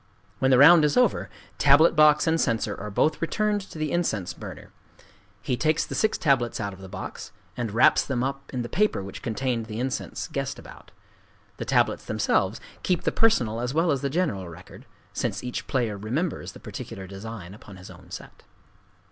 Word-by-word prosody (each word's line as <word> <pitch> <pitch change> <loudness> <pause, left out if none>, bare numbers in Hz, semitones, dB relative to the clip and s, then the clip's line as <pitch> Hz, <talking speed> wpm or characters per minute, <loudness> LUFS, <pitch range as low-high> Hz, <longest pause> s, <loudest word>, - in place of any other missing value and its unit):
When 130 - +2
the 130 - +6
round 155 +4 +8
is 150 -1 +2
over, 250 -4 +2 0.3
tablet 145 +4 +6
box 150 -1 +6
and 165 0 +2
censer 115 -2 0
are 105 - -6
both 150 +10 +1
returned 210 +4 0
to - - -10
the 155 -1 -2
incense 110 - -1
burner. - - -10 0.7
He 125 - 0
takes 155 +4 +1
the - - -7
six 220 - +1
tablets 135 -6 +1
out 100 -2 -3
of 95 - -13
the 95 - -10
box, 95 0 -7 0.2
and 120 -2 -3
wraps 115 +4 +5
them 125 -3 -2
up 135 +1 -4
in 125 -2 -2
the - - -4
paper 200 - +1
which 100 - -8
contained 120 -1 -2
the 110 0 -5
incense 130 +1 -3
guessed - - -3
about. - - -13 0.7
The - - -5
tablets - - +1
themselves - - 0 0.2
keep 180 -3 0
the - - +1
personal 120 - +2
as 125 +3 -3
well 165 +1 +3
as 140 -2 0
the 140 - -1
general 135 - -1
record,—since 80 - -7
each 125 -1 -5
player 115 -6 -1
remembers 135 - -3
the - - -12
particular 95 - -8
design 95 -1 -8
upon 100 -2 -13
his 95 0 -11
own 90 0 -15
set. - - -10
125 Hz, 190 wpm, -25 LUFS, 105-155 Hz, 0.7 s, round